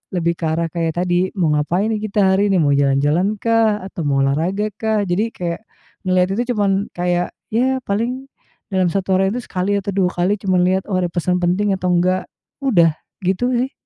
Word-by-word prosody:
lebih 170 -1 +1
ke - - -8
arah 165 +1 0
kayak 165 -1 -2
tadi 180 +1 +1
mau 165 -4 +2
ngapain 175 +8 0
kita 210 0 -2 0.2
hari 200 +1 +2
ini, 190 - +3
mau 145 -1 +3
jalan-jalan 140 +6 +2
kah 225 -2 +2
atau 190 - -6
mau 135 -1 +2
olahraga 175 +10 0
kah? 220 -1 0
Jadi 180 +5 +1
kayak 170 -1 -4 0.5
ngelihat 185 0 +2
itu 240 - +2
cuman 200 -2 +2 0.2
kayak 175 0 -1 0.2
ya 260 +3 +2
paling 240 +6 -2 0.4
dalam 185 -2 +2
satu 190 0 0
harian 190 +1 +2
itu 250 - -4
sekali 200 +2 0
atau 200 +1 -4
dua 185 -2 +2
kali 180 +4 +1
cuman 185 -3 +1
lihat, 190 +1 +1
"Oh 185 - +1
ada 180 - 0
pesan 180 +1 0
penting 195 +4 +1
atau 185 -1 -2
enggak," 185 +2 +1 0.4
udah 175 -12 +4 0.3
gitu 195 +8 0
sih. 255 +3 0
185 Hz, 190 wpm, -19 LUFS, 175-205 Hz, 0.5 s, udah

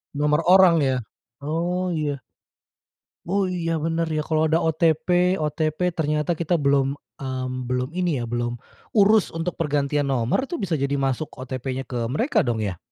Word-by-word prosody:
Nomor 150 +1 +2
orang 185 -1 +7
ya. 130 -2 +1 0.5
Oh, 175 +4 -1
iya. 145 -4 -2 1.0
Oh 190 +1 0
iya, 170 -2 -2
bener 165 +1 0
ya. 155 - 0
Kalo 155 0 +1
ada 160 +1 +2
OTP 165 +3 +2
OTP, 155 +1 -1 0.2
ternyata 150 +1 0
kita 170 +1 -1
belum, 140 -1 +2 0.2
mmm, 130 -1 -4 0.2
belum 125 +1 -1
ini 175 -8 0
ya - - -3
belum 120 0 -2 0.3
urus 210 -1 +4
untuk 165 +1 -3
pergantian 145 -2 0
nomor, 130 - +1
itu 340 +3 -5
bisa 175 -4 0
jadi 140 +1 -1
masuk 135 +2 -1
OTP-nya 130 0 -4
ke 120 -2 -2
mereka, 155 - +1
dong, 115 -2 -1
ya? 95 -5 -3
155 Hz, 160 wpm, -23 LUFS, 135-170 Hz, 1.0 s, orang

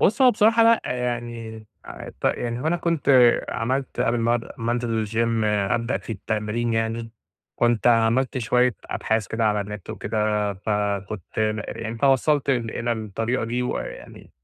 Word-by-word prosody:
بُص 225 +7 +3
هو 255 - +8
بصراحة 225 +1 +4
لأ 230 0 +5
يعني 120 -3 -4 0.2
أ - - -9
ت - - -11
يعني 120 0 0
هو 150 - -3
أنا 170 +2 +2
كنت 170 -4 -1 0.4
عملت 130 +3 -2
قبل 120 +1 +1
ما 115 +1 +2
أد 115 - -3
ما 115 +1 -1
أنزل 115 -2 -1
الGym 115 +1 0
أبدأ 105 +4 0
في 115 - -7
التمرين 110 +3 -2
يعني، 115 0 -2 0.5
كنت 120 -2 +1
عملت 120 +3 +3
شوية 125 +1 +2
أبحاث 110 -2 -1
كده 115 +3 -1
على 105 -1 +2
النت 100 -1 -7
وكده، 105 -1 -1
فكنت 100 -1 -3
م 110 0 +1 0.2
يعني 115 0 -5
فوصلت 140 +2 +3
إلى 120 -1 -1
الطريقة 110 +2 -2
دي 120 +2 -2
وإ 125 - -2
يعني - - -11
115 Hz, 160 wpm, -23 LUFS, 110-125 Hz, 0.5 s, هو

